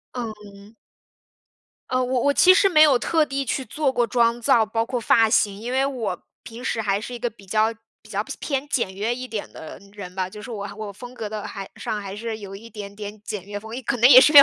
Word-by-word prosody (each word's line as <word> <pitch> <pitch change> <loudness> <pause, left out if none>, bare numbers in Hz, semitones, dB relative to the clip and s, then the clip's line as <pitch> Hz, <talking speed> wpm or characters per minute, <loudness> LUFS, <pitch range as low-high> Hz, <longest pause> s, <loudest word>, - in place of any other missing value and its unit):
嗯。 210 -3 -8 1.2
呃 255 0 +1
我 250 0 0
我 285 - +3
其 370 +5 +7
实 390 +1 +5
没 315 -5 +5
有 285 -5 +6
特 320 +3 +2
地 275 -1 -3
去 265 +2 -1
做 275 +4 -1
过 245 -2 +2
妆 235 0 +2
造， 225 -1 +4
包 225 +1 -1
括 250 +1 -2
发 225 -1 +4
型。 205 -3 +2
因 235 +3 -5
为 265 +1 +2
我 230 -10 -3 0.2
平 235 +1 -10
时 230 -3 -1
还 200 -1 0
是 230 +4 -7
一 240 - -6
个 240 0 -1
比 210 -3 -18
较 215 +3 +2 0.3
比 215 - -18
较 205 -1 -1 0.2
偏 275 -1 -2
简 235 -9 -1
约 215 +5 -1
一 255 +1 -6
点 220 -4 -5
的 160 - -9
人 185 -3 -8
吧， 185 -1 -2
就 210 +3 -10
是 245 - -8
我 205 -2 -5
我 215 -2 -5
风 245 +5 -11
格 220 -4 -5
的 215 -1 -5
还 195 -1 -7
上 210 - -4
还 195 -1 -6
是 220 +1 -5
有 195 -2 -8
一 225 +4 -11
点 205 -2 -8
点 205 0 -8
简 205 -3 -5
约 205 0 -6
风， 220 +2 -10
一 260 - -5
可 250 +2 -1
能 240 +2 +6
也 255 -2 +11
是 300 +4 +5
因 290 - +13
225 Hz, 265 characters per minute, -23 LUFS, 205-255 Hz, 1.2 s, 因